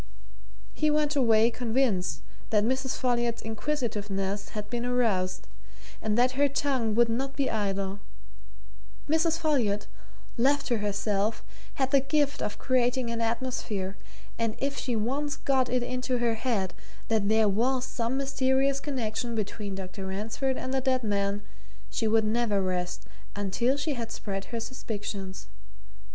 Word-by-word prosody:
He 305 - +2
went 300 0 +2
away 230 -3 +5
convinced 220 - 0 0.3
that 210 -2 +3
Mrs. 260 +3 0
Folliot's 240 -2 +1
inquisitiveness 210 -5 -2
had 210 -1 -5
been 235 +2 -2
aroused, 220 -7 +1 0.5
and 215 0 +1
that 250 +1 +5
her 280 +2 +3
tongue 260 -6 +1
would 240 +1 +5
not 265 +4 -2
be 275 -2 0
idle: 195 -2 -1 1.1
Mrs. 320 +1 +3
Folliot, 255 -11 +1 0.5
left 280 +3 +3
to 235 -3 +1
herself, 205 +1 0 0.3
had 265 -1 0
the 275 - +6
gift 285 +1 +1
of 205 - -2
creating 250 -1 +1
an 230 0 -2
atmosphere, 225 -5 -1 0.4
and 230 -1 0
if 275 +1 -1
she 250 -4 -1
once 275 +6 -1
got 260 -2 +2
it 250 0 +1
into 255 +1 -1
her 235 -1 +2
head 220 -5 -1 0.3
that 215 -2 +2
there 220 0 +5
was 250 +6 +2
some 245 0 -1
mysterious 270 0 +2
connection 240 -4 -2
between 205 -1 -3
Dr. 190 0 -6
Ransford 225 +7 -1
and 260 - -3
the 265 - +2
dead 255 -1 +1
man, 200 -1 0 0.5
she 225 - 0
would 220 0 +4
never 215 -2 +2
rest 180 -2 -2 0.3
until 220 +7 +1
she 290 +1 -1
had 230 -3 -4
spread 195 -3 -4
her 235 - -4
suspicions. 205 -5 -5
235 Hz, 145 wpm, -28 LUFS, 205-265 Hz, 1.1 s, the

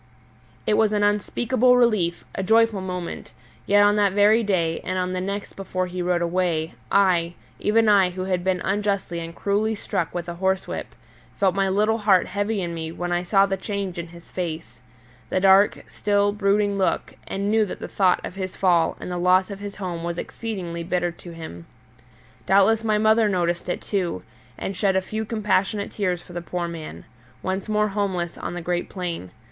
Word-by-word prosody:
It - - +2
was 215 -1 +3
an 205 -1 +1
unspeakable 240 +4 +2
relief, 210 -8 +2
a - - -2
joyful 220 0 +3
moment; 180 -2 -5 0.3
yet 205 0 +5
on 205 +1 +4
that 200 -2 +3
very 210 +3 +5
day, 170 -6 0
and 185 - -3
on 185 0 -1
the 185 - -2
next 200 +2 -4
before 185 -1 -3
he 180 0 -5
rode 175 -1 +1
away, 170 -2 0 0.2
I, 175 -3 +3 0.2
even 225 +1 +3
I 200 -3 +5
who 185 +1 -5
had 185 -2 -1
been 185 -1 0
unjustly 200 -3 -1
and 165 0 -7
cruelly 210 +2 0
struck 170 -5 -2
with 175 -1 -4
a 175 - -4
horsewhip, 190 +2 -2 0.4
felt 190 -2 +2
my 195 -1 +1
little 215 +4 +2
heart 200 -3 +4
heavy 205 +1 -1
in 170 -1 -3
me 160 -1 -4
when 175 +1 -4
I 175 0 +1
saw 195 +2 +4
the 195 -1 -2
change 195 -2 -4
in 170 - -5
his 170 0 -15
face 160 -10 -5 0.5
the - - +1
dark, 195 +2 +5
still, 205 0 +1
brooding 205 0 +1
look, 190 - 0
and 200 +1 -2
knew 220 0 +4
that - - -6
the - - -6
thought 185 -2 +2
of - - -6
his 185 -1 -5
fall 175 -4 +2
and - - -6
the 175 - -2
loss 185 +2 +3
of 200 - -6
his 205 0 -7
home 175 -4 -5
was 170 0 -3
exceedingly 180 -8 -5
bitter 175 +1 -1
to 175 +1 -12
him. 160 - -9 0.8
Doubtless 200 +4 +4
my 215 -1 +2
mother 220 0 +4
noticed 175 -2 -1
it, - - -2
too, 180 - -2 0.3
and 195 - -4
shed 195 0 +1
a - - +4
few 215 +3 -4
compassionate 210 -2 0
tears 180 -4 -1
for 175 - -13
the 175 - -4
poor 175 0 -3
man, 155 - -8 0.4
once 190 +3 -3
more 210 0 +2
homeless 190 -4 -2
on - - -5
the 175 - -4
great 175 0 -2
plain. 175 - -4
190 Hz, 195 wpm, -24 LUFS, 175-205 Hz, 0.8 s, yet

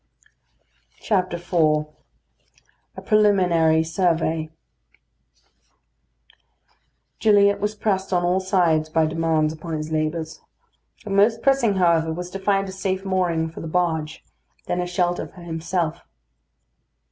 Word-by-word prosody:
IV 180 -4 -2 1.4
A - - -6
PRELIMINARY 180 -7 +3
SURVEY 165 -2 0 2.7
Gilliatt 200 -2 +4
was 210 +1 -2
pressed 195 -3 -1
on 175 -1 +1
all 180 +2 +2
sides 170 -5 +1
by 160 0 +2
demands 160 -1 0
upon 160 +1 -6
his 155 +1 -6
labours. 155 +1 -3 0.6
The 210 - -7
most 215 +3 +3
pressing, 270 -7 +2
however, 170 -3 +2
was 180 +2 -6
to 195 - -6
find 195 0 +1
a - - -6
safe 190 0 -3
mooring 175 -4 0
for - - -9
the 165 - -6
barge; 160 -2 -2 0.4
then 180 - -1
a 180 - -3
shelter 175 0 -1
for 180 - -15
himself. 165 0 -3
175 Hz, 115 wpm, -22 LUFS, 160-195 Hz, 2.7 s, Gilliatt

